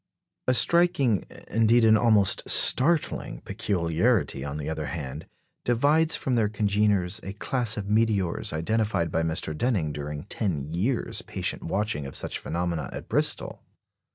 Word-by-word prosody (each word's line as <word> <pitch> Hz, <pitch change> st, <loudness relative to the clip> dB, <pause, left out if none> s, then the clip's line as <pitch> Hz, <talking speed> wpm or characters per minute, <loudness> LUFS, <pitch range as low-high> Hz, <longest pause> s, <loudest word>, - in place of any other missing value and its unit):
A 130 Hz, -, +3 dB
striking 170 Hz, -, +3 dB, 0.2 s
indeed, 115 Hz, +1 st, +3 dB
an 110 Hz, 0 st, +6 dB
almost 110 Hz, -4 st, +3 dB
startling 150 Hz, +5 st, +4 dB
peculiarity, 95 Hz, -, -1 dB
on 70 Hz, +1 st, -5 dB
the 75 Hz, -1 st, -5 dB
other 80 Hz, -1 st, -4 dB
hand, 70 Hz, -7 st, -6 dB, 0.4 s
divides 145 Hz, +7 st, +2 dB
from 130 Hz, -, -2 dB
their 110 Hz, -4 st, +1 dB
congeners 105 Hz, -2 st, 0 dB
a 95 Hz, -, -7 dB
class 120 Hz, +1 st, 0 dB
of 100 Hz, -1 st, -5 dB
meteors 105 Hz, -4 st, 0 dB
identified 95 Hz, +1 st, -1 dB
by 80 Hz, -, 0 dB
Mr. 80 Hz, -1 st, -2 dB
Denning 90 Hz, -5 st, -1 dB
during 75 Hz, 0 st, -6 dB
ten 80 Hz, -7 st, -4 dB
years' 110 Hz, +9 st, -1 dB
patient -, -, -4 dB
watching 90 Hz, -6 st, -2 dB
of 70 Hz, -, -9 dB
such -, -, -3 dB
phenomena 85 Hz, -3 st, -3 dB
at -, -, -9 dB
Bristol. -, -, 0 dB
100 Hz, 140 wpm, -25 LUFS, 80-115 Hz, 0.4 s, an